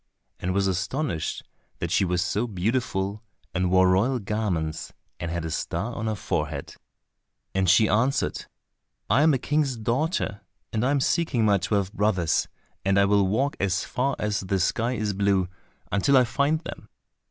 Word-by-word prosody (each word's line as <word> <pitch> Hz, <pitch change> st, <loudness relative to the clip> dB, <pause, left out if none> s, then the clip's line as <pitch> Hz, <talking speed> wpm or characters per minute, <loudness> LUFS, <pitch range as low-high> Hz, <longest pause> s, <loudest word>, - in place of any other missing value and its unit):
and 90 Hz, -, -2 dB
was 100 Hz, +1 st, +1 dB
astonished 95 Hz, -, -2 dB, 0.3 s
that -, -, -3 dB
she -, -, +3 dB
was 90 Hz, -1 st, +1 dB
so 105 Hz, +5 st, -1 dB
beautiful, 105 Hz, -1 st, -1 dB, 0.3 s
and 90 Hz, -1 st, +1 dB
wore 95 Hz, 0 st, +5 dB
royal 100 Hz, +9 st, +3 dB
garments, 95 Hz, -8 st, -2 dB, 0.3 s
and 85 Hz, -, -3 dB
had 85 Hz, -1 st, -3 dB
a 80 Hz, -, -4 dB
star 115 Hz, +9 st, -2 dB
on 115 Hz, -1 st, -3 dB
her 110 Hz, -, 0 dB
forehead. 75 Hz, -7 st, -3 dB, 0.8 s
And 95 Hz, -2 st, +2 dB
she 105 Hz, +4 st, +6 dB
answered, 115 Hz, +8 st, +1 dB, 0.7 s
"I 130 Hz, +6 st, +5 dB
am 160 Hz, +1 st, +5 dB
a -, -, +2 dB
king's 145 Hz, -1 st, 0 dB
daughter, 115 Hz, -, -1 dB, 0.3 s
and 110 Hz, 0 st, 0 dB
am 140 Hz, +2 st, +2 dB
seeking 140 Hz, -7 st, +1 dB
my 100 Hz, -2 st, +4 dB
twelve 100 Hz, +1 st, -1 dB
brothers, 95 Hz, -6 st, +1 dB, 0.4 s
and 95 Hz, 0 st, +2 dB
I 100 Hz, -, +5 dB
will 100 Hz, -1 st, +3 dB
walk 135 Hz, +10 st, 0 dB
as 100 Hz, 0 st, 0 dB
far 135 Hz, +2 st, -1 dB
as 105 Hz, -1 st, -1 dB
the 95 Hz, 0 st, -1 dB
sky 115 Hz, +7 st, +1 dB
is 105 Hz, -3 st, -1 dB
blue 100 Hz, -2 st, +2 dB, 0.4 s
until 130 Hz, +8 st, +4 dB
I 130 Hz, -, +6 dB
find 140 Hz, +6 st, +1 dB
them." -, -, -9 dB
105 Hz, 165 wpm, -25 LUFS, 95-125 Hz, 0.8 s, she